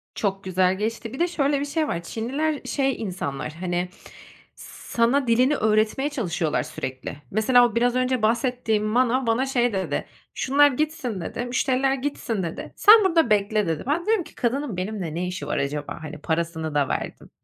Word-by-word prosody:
Çok 195 Hz, -2 st, -2 dB
güzel 185 Hz, 0 st, +1 dB
geçti. 225 Hz, +2 st, -3 dB
Bir 265 Hz, -, -7 dB
de 345 Hz, -, +3 dB
şöyle 285 Hz, -4 st, 0 dB
bir 285 Hz, -, -2 dB
şey 305 Hz, +1 st, -1 dB
var. 170 Hz, -, -3 dB
Çinliler 275 Hz, -, -2 dB
şey 270 Hz, -3 st, -1 dB
insanlar, 155 Hz, -8 st, -4 dB
hani, 175 Hz, +1 st, -2 dB, 0.7 s
sana 240 Hz, +3 st, -1 dB
dilini 250 Hz, +5 st, +3 dB
öğretmeye 220 Hz, +5 st, +1 dB
çalışıyorlar 175 Hz, -, -1 dB
sürekli. 130 Hz, +1 st, -6 dB, 0.2 s
Mesela 245 Hz, +4 st, +5 dB
o 230 Hz, -, -9 dB
biraz 245 Hz, +1 st, +2 dB
önce 255 Hz, -1 st, +1 dB
bahsettiğim 230 Hz, -1 st, +1 dB
manav 245 Hz, +4 st, +2 dB
bana 230 Hz, +4 st, +2 dB
şey 245 Hz, -3 st, +1 dB
dedi: 190 Hz, -1 st, -2 dB, 0.3 s
"Şunlar 285 Hz, +2 st, +4 dB
gitsin," 265 Hz, -, -2 dB
dedi, 240 Hz, +8 st, -4 dB
"müşteriler 260 Hz, +2 st, +1 dB
gitsin," 255 Hz, -6 st, -3 dB
dedi. 165 Hz, -1 st, -6 dB
"Sen 430 Hz, 0 st, +7 dB
burada 330 Hz, -8 st, +3 dB
bekle," 210 Hz, -1 st, +2 dB
dedi. 160 Hz, -2 st, -2 dB
Ben 330 Hz, +4 st, 0 dB
diyorum 435 Hz, -4 st, +2 dB
ki: -, -, -16 dB
"Kadının 250 Hz, -3 st, -1 dB
benimle 185 Hz, -4 st, -4 dB
ne 180 Hz, +2 st, -2 dB
işi 180 Hz, +1 st, -5 dB
var -, -, -1 dB
acaba?" 145 Hz, +1 st, -3 dB
Hani, 155 Hz, 0 st, -7 dB
parasını 160 Hz, -1 st, -2 dB
da 140 Hz, -2 st, +2 dB
verdim. -, -, -4 dB
230 Hz, 170 wpm, -24 LUFS, 185-270 Hz, 0.7 s, Sen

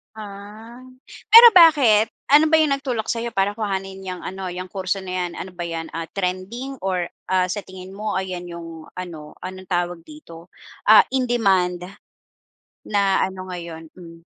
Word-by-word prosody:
Ah. 210 Hz, +3 st, -11 dB, 0.6 s
Pero 470 Hz, +1 st, +12 dB
bakit? 265 Hz, -11 st, +5 dB, 0.2 s
Ano 300 Hz, +2 st, +6 dB
ba 320 Hz, 0 st, +4 dB
'yong 305 Hz, -, +2 dB
nagtulak 250 Hz, -5 st, -4 dB
sa'yo 235 Hz, 0 st, -3 dB
para 200 Hz, +2 st, 0 dB
kuhanin 195 Hz, -2 st, -4 dB
'yang 185 Hz, -1 st, -6 dB
ano, 190 Hz, 0 st, -6 dB
'yang 180 Hz, 0 st, -6 dB
kurso 190 Hz, 0 st, -3 dB
na 185 Hz, -, -9 dB, 0.2 s
'yan? 175 Hz, -, -6 dB
Ano 190 Hz, -, -7 dB
ba 175 Hz, -, -4 dB
'yan, 165 Hz, -1 st, -5 dB
ah, 165 Hz, 0 st, -5 dB
trending 195 Hz, +8 st, -4 dB
or, 180 Hz, -2 st, -1 dB, 0.2 s
ah, 185 Hz, -1 st, +1 dB
sa 205 Hz, 0 st, -4 dB
tingin 185 Hz, 0 st, -11 dB
mo 210 Hz, 0 st, -3 dB
ayan 185 Hz, -1 st, -4 dB
'yong 165 Hz, -2 st, -10 dB
ano, 165 Hz, -5 st, -8 dB
anong 185 Hz, +1 st, -8 dB
tawag 175 Hz, -1 st, -2 dB
dito, 175 Hz, -, -14 dB, 0.3 s
ah, 475 Hz, -, +8 dB
in 260 Hz, -1 st, 0 dB
demand 190 Hz, -7 st, +1 dB, 1.0 s
na 200 Hz, -2 st, +1 dB
ano 185 Hz, 0 st, -8 dB
ngayon? 170 Hz, -3 st, -8 dB
Hmm. 165 Hz, -1 st, -13 dB
190 Hz, 165 wpm, -21 LUFS, 180-220 Hz, 1.0 s, Pero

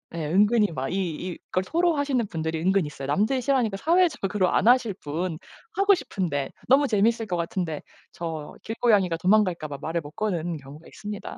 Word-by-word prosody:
예. 160 Hz, -, -3 dB
은근히 210 Hz, +7 st, +4 dB
마 135 Hz, -1 st, -3 dB
이 180 Hz, -2 st, -3 dB
이걸 185 Hz, -, 0 dB
토로하시는 285 Hz, -, +1 dB
분들이 160 Hz, -1 st, -3 dB
은근히 190 Hz, -3 st, +2 dB
있어요. 140 Hz, -2 st, -7 dB
남들이 215 Hz, -, +1 dB
싫어하니까 240 Hz, -6 st, +1 dB
사회적으로 290 Hz, -, +2 dB
안 215 Hz, -, +2 dB
하실 240 Hz, -4 st, +4 dB
뿐 160 Hz, +3 st, -3 dB, 0.4 s
하고 400 Hz, 0 st, +4 dB
싶은데 160 Hz, -, -2 dB, 0.2 s
너무 275 Hz, +3 st, +5 dB
재밌을 225 Hz, +1 st, +2 dB
것 180 Hz, -, -1 dB
같은데 170 Hz, -2 st, -3 dB, 0.3 s
저 160 Hz, -3 st, -6 dB
길고양이가 210 Hz, -7 st, +2 dB
도망갈까 185 Hz, -4 st, +2 dB
봐 140 Hz, -1 st, -6 dB
말을 165 Hz, +1 st, -2 dB
못 145 Hz, 0 st, -10 dB
거는 175 Hz, -6 st, -2 dB
경우가 145 Hz, +3 st, -13 dB
있습니다. 205 Hz, -1 st, -7 dB
190 Hz, 400 characters per minute, -25 LUFS, 165-230 Hz, 0.4 s, 너무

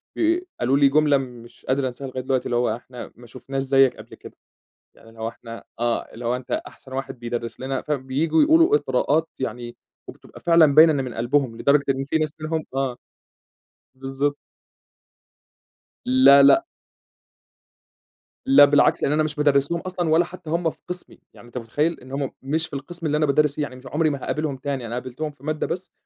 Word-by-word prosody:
ب 335 Hz, +2 st, +2 dB, 0.2 s
قالوا 130 Hz, +3 st, +2 dB
لي 140 Hz, -1 st, +5 dB
جملة 150 Hz, 0 st, +3 dB
مش 120 Hz, -3 st, -9 dB
قادر 130 Hz, +1 st, 0 dB
أنساها 130 Hz, +2 st, -7 dB
لغاية 130 Hz, 0 st, -5 dB
دلوقتي 130 Hz, 0 st, -1 dB
اللي 120 Hz, -, -2 dB
هو: 120 Hz, -2 st, +1 dB
"إحنا 125 Hz, +1 st, -10 dB
ما 120 Hz, 0 st, -15 dB
شُفناش 135 Hz, +3 st, -5 dB
زيك 135 Hz, -1 st, +3 dB
قبل -, -, -12 dB
كده."، -, -, -13 dB, 0.6 s
يعني 115 Hz, -, -19 dB
اللي 115 Hz, 0 st, -16 dB
هو 110 Hz, -, -2 dB
إحنا 115 Hz, 0 st, -10 dB, 0.2 s
آه 120 Hz, 0 st, 0 dB
اللي 115 Hz, +2 st, -9 dB
هو 120 Hz, +2 st, 0 dB
أنتَ 125 Hz, 0 st, -11 dB
أحسن 130 Hz, -, -6 dB
واحد 130 Hz, -1 st, -5 dB
بيدرِّس 120 Hz, -1 st, -5 dB
لنا، 130 Hz, 0 st, -3 dB
فبييجوا 150 Hz, +3 st, 0 dB
يقولوا 330 Hz, +6 st, +5 dB
إطراءات 160 Hz, -, 0 dB
يعني 120 Hz, -2 st, -5 dB, 0.3 s
وبتبقى -, -, -13 dB
فعلًا 165 Hz, -4 st, +4 dB
باينة 160 Hz, +1 st, +8 dB
إن 135 Hz, -3 st, -1 dB
من 125 Hz, -3 st, -7 dB
قلبهم، 120 Hz, +1 st, 0 dB
لدرجة 140 Hz, +3 st, +2 dB
إن 135 Hz, 0 st, -1 dB
في 150 Hz, +3 st, 0 dB
ناس 155 Hz, -1 st, -2 dB
منهم 155 Hz, 0 st, -3 dB
آه 135 Hz, -2 st, -1 dB, 1.0 s
بالضبط. 135 Hz, +2 st, -2 dB, 1.7 s
لا 135 Hz, +2 st, +6 dB
لأ. 335 Hz, -, +5 dB, 1.8 s
لا 270 Hz, -, +8 dB
بالعكس 145 Hz, 0 st, +3 dB
لإن -, -, +1 dB
أنا 155 Hz, +1 st, +2 dB
مش 155 Hz, -1 st, -3 dB
بادرِّس 145 Hz, 0 st, +2 dB
لهم 170 Hz, 0 st, -1 dB
أصلًا 180 Hz, -2 st, -3 dB
ولا 165 Hz, +2 st, +4 dB
حتى 175 Hz, -2 st, -11 dB
هم 170 Hz, +1 st, 0 dB
في -, -, -13 dB
قِسمي، 180 Hz, 0 st, -7 dB
يعني 120 Hz, -, -16 dB
أنتَ 120 Hz, -, -9 dB
متخيِّل؟ 145 Hz, +8 st, -1 dB
إن 130 Hz, -, -14 dB
هم 140 Hz, 0 st, -3 dB
مش 160 Hz, +4 st, -1 dB
في -, -, -22 dB
القِسم 165 Hz, +5 st, -7 dB
اللي 150 Hz, 0 st, +1 dB
أنا 155 Hz, -, +2 dB
بادرِّس 150 Hz, 0 st, +2 dB
فيه 155 Hz, -, -3 dB
يعني 145 Hz, -3 st, -4 dB
مش 130 Hz, +1 st, -14 dB
عمري 155 Hz, +4 st, +1 dB
ما 140 Hz, -, -2 dB
هاقابلهم 150 Hz, -3 st, -2 dB
تاني، 135 Hz, -2 st, -4 dB
أنا 115 Hz, -, -6 dB
قابلتهم 130 Hz, +5 st, -5 dB
في 140 Hz, -2 st, -25 dB
مادة 155 Hz, 0 st, -2 dB
بس 185 Hz, 0 st, -5 dB
140 Hz, 195 wpm, -23 LUFS, 130-155 Hz, 1.8 s, باينة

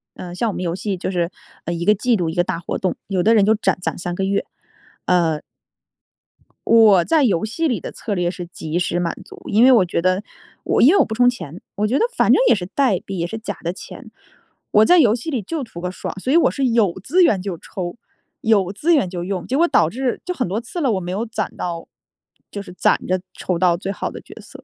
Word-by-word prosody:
呃， 175 Hz, -1 st, -8 dB
像 225 Hz, +5 st, -1 dB
我 -, -, -4 dB
们 -, -, -4 dB
游 170 Hz, -1 st, -1 dB
戏 195 Hz, 0 st, -3 dB
就 185 Hz, -, -3 dB
是 175 Hz, -1 st, -1 dB, 0.4 s
一 170 Hz, 0 st, -3 dB
个 210 Hz, -, +6 dB
季 230 Hz, +4 st, +1 dB
度 175 Hz, -5 st, -1 dB
一 160 Hz, -, -4 dB
个 175 Hz, -, +2 dB
大 170 Hz, -1 st, -3 dB
活 170 Hz, -, -5 dB
动， 185 Hz, -, -1 dB
有 190 Hz, -3 st, 0 dB
的 225 Hz, +4 st, +4 dB
人 200 Hz, -2 st, +5 dB
就 220 Hz, -, +4 dB
攒 210 Hz, -, 0 dB
攒 180 Hz, -, -3 dB
3 175 Hz, 0 st, -4 dB
个 195 Hz, -, -2 dB
月， 195 Hz, +1 st, 0 dB, 0.7 s
呃。 165 Hz, -4 st, +2 dB, 1.3 s
我 215 Hz, -6 st, +6 dB
在 315 Hz, -, +2 dB
游 200 Hz, -8 st, +2 dB
戏 275 Hz, +10 st, -1 dB
里 245 Hz, -6 st, -1 dB
的 -, -, -7 dB
策 215 Hz, -, -5 dB
略 175 Hz, -2 st, 0 dB
是 175 Hz, -1 st, -6 dB
及 165 Hz, -1 st, -5 dB
时 175 Hz, 0 st, 0 dB
满 170 Hz, -1 st, -1 dB
足， -, -, -13 dB
因 215 Hz, +3 st, +4 dB
为 260 Hz, -, +8 dB
我 215 Hz, -7 st, +5 dB
觉 170 Hz, -, -1 dB
得 185 Hz, +3 st, +1 dB, 0.4 s
我 -, -, +1 dB
因 255 Hz, -, +7 dB
为 395 Hz, -, +4 dB
我 -, -, +6 dB
不 220 Hz, -, -5 dB
充 245 Hz, +1 st, +5 dB
钱， 175 Hz, -, -7 dB, 0.2 s
我 210 Hz, +1 st, 0 dB
觉 255 Hz, +5 st, +1 dB
得 -, -, +3 dB
反 -, -, +3 dB
正 -, -, +5 dB
也 -, -, +6 dB
是 185 Hz, -4 st, -4 dB
代 250 Hz, -10 st, +2 dB
币， 195 Hz, -, -7 dB
也 170 Hz, -, -1 dB
是 225 Hz, +6 st, -5 dB
假 220 Hz, -, -6 dB
的 170 Hz, +1 st, -2 dB
钱。 -, -, -11 dB, 0.6 s
我 215 Hz, +1 st, +5 dB
在 355 Hz, -1 st, +6 dB
游 230 Hz, -8 st, +5 dB
戏 245 Hz, +7 st, -6 dB
里 260 Hz, -7 st, -1 dB
就 290 Hz, -, -4 dB
图 170 Hz, -8 st, -9 dB
个 180 Hz, 0 st, -3 dB
爽， -, -, -6 dB
所 255 Hz, -, -2 dB
以 325 Hz, -, +5 dB
我 -, -, +4 dB
是 275 Hz, -, -1 dB
有 225 Hz, -7 st, +2 dB
资 360 Hz, -, +3 dB
源 200 Hz, -, +3 dB
就 185 Hz, -3 st, -4 dB
抽， 180 Hz, +5 st, -6 dB, 0.4 s
有 200 Hz, -5 st, +2 dB
资 315 Hz, +12 st, +1 dB
源 190 Hz, -11 st, +1 dB
就 175 Hz, -1 st, -5 dB
用， 185 Hz, -1 st, -3 dB
结 265 Hz, -, 0 dB
果 340 Hz, -, +4 dB
导 160 Hz, -, +3 dB
致 250 Hz, +5 st, -2 dB
就 360 Hz, -, -3 dB
很 255 Hz, -, -2 dB
多 210 Hz, +6 st, -2 dB
次 350 Hz, -, -6 dB
了， 265 Hz, -5 st, +2 dB
我 190 Hz, -, 0 dB
没 175 Hz, 0 st, -5 dB
有 210 Hz, +5 st, -2 dB
攒 220 Hz, -3 st, -4 dB
到 170 Hz, -2 st, -4 dB, 0.6 s
就 200 Hz, -, -5 dB
是 200 Hz, -, -11 dB
攒 -, -, +1 dB
着 185 Hz, 0 st, +1 dB
抽 180 Hz, -2 st, -2 dB
到 180 Hz, -2 st, +3 dB
最 190 Hz, +3 st, -4 dB
好 -, -, -4 dB
的 -, -, -9 dB
角 -, -, -14 dB
色。 -, -, -13 dB
195 Hz, 275 characters per minute, -20 LUFS, 175-235 Hz, 1.3 s, 为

